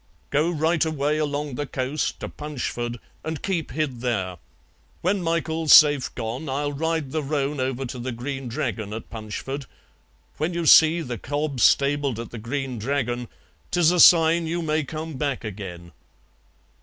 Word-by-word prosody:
"Go 150 +4 +2
right 165 0 +1
away 150 -1 0
along 145 -1 -2
the 145 +3 -3
coast 135 +4 -2
to - - -3
Punchford 120 -5 -4 0.3
and 160 -1 -5
keep 175 -5 -1
hid 135 -5 -3
there. 95 -8 -1 0.6
When 190 +2 +1
Michael's 165 -2 +2
safe 145 -4 +6
gone 120 +7 -4
I'll 145 +2 -1
ride 160 -1 -1
the 155 - -1
roan 145 0 -1
over 130 0 -2
to 125 0 -6
the 130 +2 -3
Green 135 +2 -5
Dragon 110 -2 -3
at 110 - -8
Punchford; 115 +5 -5 0.7
when 165 +3 -1
you 170 -1 -1
see 160 +2 +7
the 120 -7 -5
cob 145 +1 -3
stabled 140 -1 +3
at 115 - -7
the 115 - -7
Green 130 +1 -4
Dragon 120 0 -2 0.4
'tis 175 -2 +4
a 180 - +1
sign 165 0 +6
you 170 +1 -2
may 155 0 0
come 155 +1 -6
back 140 -4 -2
agen." 90 -5 -7
145 Hz, 160 wpm, -24 LUFS, 125-160 Hz, 0.7 s, see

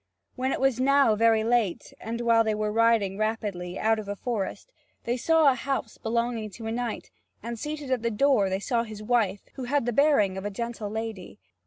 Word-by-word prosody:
When 260 +1 -1
it - - -1
was 265 -2 +2
now 275 -3 +4
very 225 0 +3
late, 225 -6 0
and 230 +1 -4
while 230 -1 +4
they 220 -1 0
were 210 0 -1
riding 220 -3 +2
rapidly 205 -5 -2
out 220 0 +2
of 210 - -7
a 205 - -3
forest, 235 - -4 0.3
they 240 - -1
saw 315 +3 +4
a - - +1
house 255 -2 -3
belonging 235 -1 -1
to 230 - -8
a 225 - -2
knight, 235 -1 -4 0.3
and 235 0 -5
seated 295 -1 -5
at 255 -3 +1
the 235 - 0
door 230 -3 +3
they 190 +1 -1
saw 235 +3 0
his 215 -2 -7
wife, 210 -4 +1
who 260 - -6
had 280 0 0
the 240 - -1
bearing 215 -9 +3
of - - -8
a 205 - -2
gentle 230 0 -5
lady. 220 - -6
230 Hz, 210 wpm, -26 LUFS, 210-245 Hz, 0.3 s, now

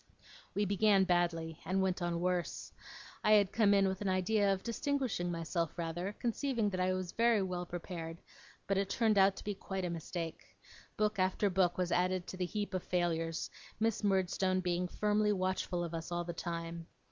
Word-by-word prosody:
We 205 - +2
began 200 0 +4
badly, 170 -3 0
and 185 +3 0
went 190 -1 0
on 175 -1 -1
worse. 180 -1 -1 0.5
I 215 - +5
had 205 -2 +5
come 215 -3 +4
in 195 -1 +5
with 190 +1 -2
an 200 - 0
idea 195 +2 +2
of 195 -1 -1
distinguishing 250 -7 -1
myself 165 0 -2
rather, 175 +4 -3
conceiving 235 -2 -1
that 185 - -3
I 185 0 +2
was 185 -1 -2
very 230 -3 +3
well 180 -1 -3
prepared; 165 -1 -6 0.5
but 195 -1 +1
it 195 0 -1
turned 220 -1 +3
out 195 0 +5
to - - -9
be 205 - -2
quite 190 -1 -4
a 175 - -2
mistake. 165 0 -6 0.4
Book 215 -1 +1
after 190 +2 +2
book 180 -1 +2
was 180 -1 0
added 180 0 +1
to 185 - -7
the 185 - 0
heap 205 0 -3
of 185 - 0
failures, 165 -2 -1 0.3
Miss 220 -1 +1
Murdstone 190 -1 +2
being 180 0 0
firmly 210 +2 +1
watchful 185 -2 -1
of 170 -1 -5
us 165 +1 -5
all 175 0 -1
the 170 0 -5
time. 170 -1 -5
185 Hz, 190 wpm, -34 LUFS, 175-205 Hz, 0.5 s, I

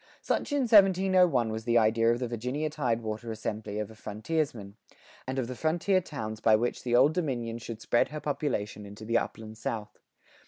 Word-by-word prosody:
Such - - -1
in 285 -1 +2
1701 185 - +5
was 110 0 -5
the 120 -1 +3
idea 115 +1 +4
of 120 - +1
the 125 0 -3
Virginia 125 +7 -3
tidewater 115 -5 -2
assembly 105 -1 -4
of 105 0 -3
a - - -13
frontiersman, 110 -1 -3 0.5
and 130 +1 -3
of 130 - 0
the 125 - -5
frontier 175 +6 +1
towns 110 -10 -6
by 110 -1 +5
which 120 +3 -1
the 120 -1 0
Old 135 +5 +5
Dominion 120 -9 -2
should 115 -1 -8
spread 120 - +2
her 150 +1 -6
population 135 -9 -2
into 105 +2 -10
the 115 +1 +2
upland 110 0 -7
South. 105 -2 -5
120 Hz, 185 wpm, -29 LUFS, 110-150 Hz, 0.5 s, 1701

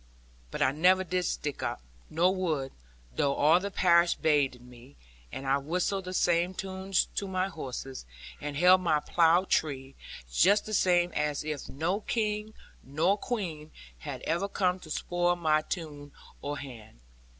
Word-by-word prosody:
But - - -1
I 130 - +3
never 180 +6 +3
did 180 0 -1
stick 145 -3 -3
up, - - -3 0.3
nor 175 +4 +2
would, 155 -8 -2 0.4
though 140 -1 +1
all 155 +4 +5
the 200 +2 -4
parish 170 -3 +4
bade 145 -5 +1
me; 120 - -16 0.4
and 135 - -6
I 135 +1 +2
whistled 180 +6 -2
the 185 - -5
same 175 +1 +2
tunes 190 0 -1
to 200 - -3
my 185 0 -1
horses, 135 - -7 0.3
and 145 -1 -4
held 180 +3 +6
my 160 -4 +2
plough 170 +3 +3
tree, 135 -7 -1 0.4
just 200 - +4
the 215 - -6
same 175 -3 +3
as 150 -1 -1
if 150 -2 -5
no 165 +8 -1
King, 215 -1 -2 0.3
nor 160 +8 +1
Queen, 180 -10 -4 0.3
had - - -7
ever 170 +5 0
come 185 -2 0
to 160 - -13
spoil 175 +3 0
my 155 -3 +2
tune 150 -4 -6 0.3
or 145 +1 -4
hand. 120 - -10
170 Hz, 160 wpm, -29 LUFS, 145-185 Hz, 0.4 s, held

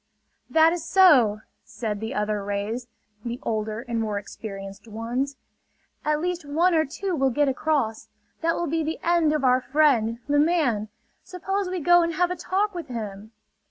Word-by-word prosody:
"That 320 +1 +5
is 350 -2 -4
so!" 300 - +5 0.2
said 215 -2 -4
the 220 +1 -5
other 210 -1 -1
rays, 205 +5 -3 0.4
the 240 +1 -4
older 215 0 -2
and 230 -1 -1
more 210 -2 -2
experienced 195 0 -8
ones. 240 +6 -3 0.7
"At 300 0 0
least 355 -1 -2
one 325 +5 +2
or 315 -1 +3
two 365 +5 -3
will 270 -3 +2
get 290 +3 +1
across. 265 -5 -1 0.3
That 330 0 +1
will 345 - -1
be 325 +1 -1
the 315 +2 -3
end 340 -3 +3
of 300 -2 0
our 255 0 +4
friend, 250 -5 +2
the 290 0 +3
man! 290 -10 +1 0.3
Suppose 385 +1 -3
we 370 0 -2
go 350 +3 +6
and 335 -1 -1
have 355 +2 +1
a - - -1
talk 405 +3 -1
with 345 -4 -6
him!" 215 -3 -6
280 Hz, 175 wpm, -25 LUFS, 220-335 Hz, 0.7 s, go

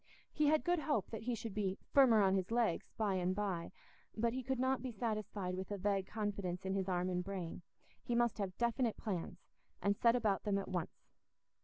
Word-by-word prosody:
He 300 - +3
had 310 +1 +4
good 350 -1 +2
hope 290 -8 0
that 225 - -4
he 240 +1 -1
should 225 -2 -6
be 195 -2 -1 0.2
"firmer 240 -7 +7
on 190 -1 +4
his 190 -2 0
legs" 230 -6 +1
by 210 -3 +1
and 185 0 0
by; 190 -5 -2 0.5
but 230 +1 +1
he 260 - -2
could 265 +1 -1
not 260 0 +1
be 255 -1 -4
satisfied 210 -4 -2
with 190 0 -5
a 205 - -2
vague 195 0 0
confidence 200 -4 -3
in 190 - 0
his 195 -1 -1
arm 180 0 +1
and 180 -1 -1
brain; 185 -3 -5 0.4
he 240 - -2
must 235 -2 +2
have 190 -2 -3
definite 235 -1 +1
plans, 180 -3 -4 0.4
and 200 0 +2
set 235 +3 +4
about 215 -5 +1
them 205 -2 +1
at 195 - -3
once. 180 -3 -5
205 Hz, 210 wpm, -36 LUFS, 190-235 Hz, 0.5 s, firmer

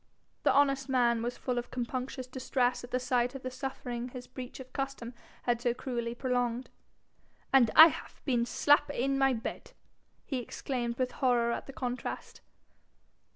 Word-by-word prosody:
The - - +4
honest 275 -1 +3
man 240 -3 +3
was 240 +1 -3
full 250 -2 -1
of 240 - -7
compunctious 255 +1 -4
distress 255 -1 0
at 245 - -8
the 255 - 0
sight 250 0 0
of 270 - -7
the 255 - -4
suffering 250 -2 -4
his 250 0 -8
breach 255 0 -8
of 260 -1 -11
custom 270 -3 -4 0.3
had 240 -1 +1
so 240 -1 +1
cruelly 240 -2 -3
prolonged. 245 -1 -1 0.8
'And 255 -4 +6
I 320 +1 +12
haf - - -9
bin 240 -3 +1
slap 290 +2 +4
in 275 0 0
mine 270 -2 +3
bed!' 225 - -6 0.5
he 265 -4 -2
exclaimed 240 0 -3
with 255 -1 0
horror 245 -3 +2
at - - -4
the 275 - -8
contrast. 250 -2 -5
250 Hz, 165 wpm, -31 LUFS, 240-265 Hz, 0.8 s, I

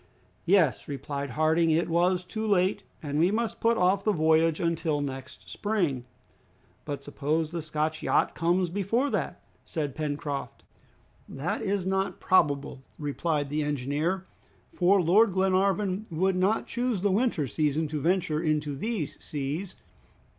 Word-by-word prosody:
"Yes," 175 -7 +3
replied 140 0 -4
Harding, 160 +4 +2
"it 160 +2 +2
was 180 +2 +2
too 220 +4 -4
late, 190 -1 +2 0.2
and 145 0 -2
we 170 +3 +4
must 225 +2 -1
put 230 0 +2
off 190 +1 +2
the 215 - +3
voyage 160 -2 +3
until 165 -3 0
next 135 -2 -6
spring." 175 - -1 0.8
"But 140 -1 -5
suppose 150 +3 -1
the 170 -1 -3
Scotch 155 0 -2
yacht - - +2
comes 175 +1 +1
before 215 +9 0
that," - - -3 0.2
said 150 -5 -3
Pencroft. 145 -2 -4 0.7
"That 150 +11 -3
is 200 -3 -1
not 190 +1 -1
probable," 140 -7 +2 0.2
replied 145 0 -2
the 155 +1 0
engineer, 150 +6 -1 0.5
"for 190 +2 +4
Lord 190 +4 +4
Glenarvan 195 +2 +1
would 185 +3 +1
not 190 +4 +1
choose 240 -5 -1
the 200 0 +2
winter 210 - +1
season 150 +3 0
to 150 -1 -3
venture 165 -2 +1
into 150 -3 0
these 210 - -4
seas. 150 +6 -4
165 Hz, 140 wpm, -28 LUFS, 150-190 Hz, 0.8 s, we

